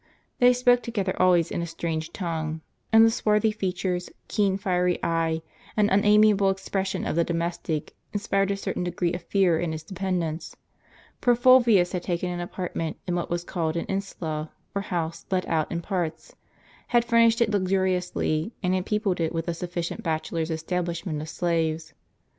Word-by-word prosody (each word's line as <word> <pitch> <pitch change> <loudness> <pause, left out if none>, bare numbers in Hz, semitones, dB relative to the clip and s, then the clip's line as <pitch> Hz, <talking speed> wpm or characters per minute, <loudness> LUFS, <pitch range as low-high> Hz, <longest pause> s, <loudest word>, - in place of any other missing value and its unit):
They 245 0 +7
spoke 245 0 +4
together 200 -6 -2
always 180 -3 +4
in - - -2
a 170 - -3
strange 165 -1 -3
tongue, 160 -4 -3 0.3
and 225 0 +8
the 225 - +4
swarthy 215 0 +2
features, 180 -3 -2 0.2
keen 200 -3 +1
fiery 180 -3 +1
eye, 165 -1 0 0.3
and 210 -1 +3
unamiable 210 0 +5
expression 195 0 -2
of - - -1
the 170 - +3
domestic, 170 -2 -3 0.2
inspired 195 -1 0
a 200 - 0
certain 195 - -3
degree 175 -1 -1
of 175 - -4
fear 175 -2 +2
in 170 -2 -1
his 155 0 -6
dependants; 175 -3 -3 0.7
for 245 -1 +4
Fulvius 235 -7 +5
had 180 - -2
taken 180 0 -2
an 175 - -4
apartment 175 -2 -4
in 180 - -2
what 175 0 -2
was 175 0 -1
called 165 -3 -2
an 170 - -2
insula, 160 -6 -4 0.2
or 200 - -1
house 170 -4 -4
let 185 -1 0
out 160 -2 0
in 170 - -2
Dtr - - -22
w - - -20 0.2
parts, 160 - -20 0.5
had 240 -1 +3
furnished 230 -1 +4
it 230 -2 +2
luxuriously, 185 -2 0
and 180 0 +2
had 185 0 -1
peopled 210 -4 0
it 160 - 0
with 165 0 -3
a 170 - 0
sufficient 175 0 -4
bachelor's 160 0 -2
establishment 170 0 -2
of 155 - -7
slaves. 160 -2 -1
180 Hz, 175 wpm, -26 LUFS, 165-200 Hz, 0.7 s, and